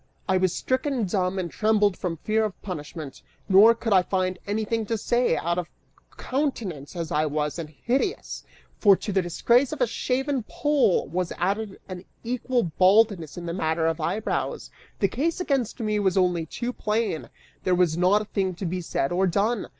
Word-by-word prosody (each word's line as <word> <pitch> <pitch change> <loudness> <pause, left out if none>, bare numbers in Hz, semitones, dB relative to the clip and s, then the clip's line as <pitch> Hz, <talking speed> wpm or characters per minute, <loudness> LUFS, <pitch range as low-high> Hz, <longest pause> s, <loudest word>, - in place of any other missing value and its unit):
I 190 -1 +3
was 185 -1 +2
stricken 260 - -1
dumb, 185 0 -1
and 175 -3 -3
trembled 210 -2 +2
from 170 -3 -3
fear 220 +6 0
of 215 -3 -3
punishment, 155 -5 -7 0.3
nor 210 +4 +7
could 225 -2 -1
I 190 - +6
find 185 0 -1
anything 220 +2 -1
to 225 - 0
say, 240 -2 +1
out 170 +1 -1
of 175 - -5 0.5
countenance 225 - -3
as 165 -2 -4
I 155 +1 +1
was 150 +2 -2
and 160 -2 -5
hideous, 265 - -2 0.4
for 200 -3 +7
to 205 - -5
the 190 0 +2
disgrace 235 +9 +2
of - - -5
a - - +4
shaven 270 - -1
poll 290 -10 +2
was 175 +4 -2
added 200 +3 -2
an 185 -1 -8 0.2
equal 245 +1 0
baldness 185 -1 +3
in 175 - -6
the 170 - -3
matter 160 -2 0
of 165 0 0
eyebrows; 190 +8 -2 0.3
the 195 - +2
case 305 - -1
against 270 - -1
me 215 -2 0
was 195 -2 +1
only 175 -3 +2
too 240 +9 -4
plain, 215 -8 -2 0.3
there 185 -1 +2
was 175 -3 +2
not 185 +5 +3
a - - -11
thing 190 -3 -1
to 185 - -5
be 180 +1 -2
said 140 -4 -1
or 185 +2 +2
done! 205 +5 0
195 Hz, 185 wpm, -25 LUFS, 175-225 Hz, 0.5 s, nor